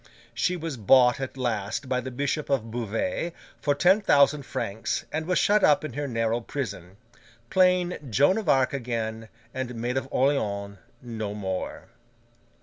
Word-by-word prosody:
She 180 0 0
was 165 -5 -5
bought 125 +4 +5
at 135 0 -5
last 115 0 -2
by 125 -1 0
the 130 - -5
Bishop 140 +4 -2
of 120 -5 0
Beauvais 115 - -2 0.3
for 145 -1 +1
ten 185 +8 +4
thousand 145 - +3
francs, 105 +3 -3
and 160 +1 -3
was 180 - +1
shut 210 0 +3
up 190 -2 +5
in 145 - -6
her 145 +2 -3
narrow 115 -1 0
prison: 100 -8 -6 0.5
plain 180 -1 +3
Joan 145 - +3
of 215 - -3
Arc 130 0 +3
again, 115 -4 -3 0.2
and 130 -2 -4
Maid 120 +3 -2
of 130 - -2
Orleans 100 -8 0 0.2
no 110 -4 -5
more. 95 -3 -4
130 Hz, 155 wpm, -26 LUFS, 110-145 Hz, 0.5 s, bought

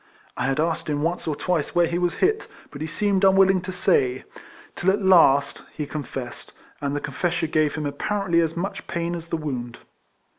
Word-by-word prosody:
I - - -2
had 135 +2 0
asked 165 +1 0
him 145 0 -1
once 170 +1 -2
or 155 - 0
twice 175 -1 -1
where 175 0 +5
he 170 +1 -1
was 175 -1 0
hit, 420 +3 +1 0.2
but 145 - -9
he 155 - -2
seemed 200 +4 0
unwilling 190 -1 +5
to 185 +1 -5
say, 130 -8 +1 0.5
till 185 - 0
at 200 +1 +1
last 145 -7 +5
he 150 - -3
confessed; 140 -4 -7 0.3
and 140 0 -1
the - - 0
confession 175 0 -2
gave 155 -2 +2
him 155 -2 -3
apparently 170 +4 0
as 165 0 -1
much 195 +4 -4
pain 170 0 -2
as 170 -1 -6
the 165 - -2
wound. 125 -6 -5
165 Hz, 195 wpm, -24 LUFS, 145-185 Hz, 0.5 s, where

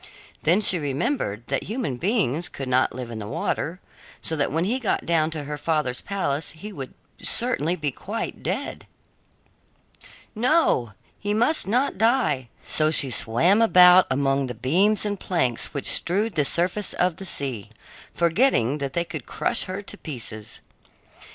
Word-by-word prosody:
Then 175 +7 +3
she 185 -4 +5
remembered 140 - -2
that - - -2
human 220 - -3
beings 175 - 0
could 135 - -6
not 130 +1 +2
live 125 -2 -6
in 110 - -6
the 105 - -6
water, 165 - -3 0.4
so 160 - -1
that 145 -2 0
when 165 +3 0
he 235 +8 0
got 230 - -1
down 160 -2 +2
to 155 -2 -4
her 145 +1 -6
father's 150 -6 0
palace 160 -7 -2
he 205 +6 -9
would 135 -6 -8 0.3
certainly 180 - +2
be 150 -5 -2
quite 210 - -5
dead. - - -4 1.5
No, 235 - +2 0.3
he 205 +1 -1
must 240 +6 +3
not 250 +5 0
die! 220 - +1
So 155 0 +2
she 140 -4 0
swam 150 - +2
about 180 -4 +7
among 135 0 +1
the 125 - -6
beams 195 +10 +2
and 205 -2 -2
planks 130 -10 -1
which 140 - -4
strewed 205 +5 +1
the 150 -4 +2
surface 180 +7 +1
of 180 -2 0
the 195 - -7
sea, 130 - -4 0.4
forgetting 170 - +2
that 140 -1 -4
they 170 - 0
could 155 -5 -7
crush - - 0
her 190 +2 -5
to 205 - -5
pieces. 115 -7 -6
165 Hz, 160 wpm, -24 LUFS, 135-205 Hz, 1.5 s, about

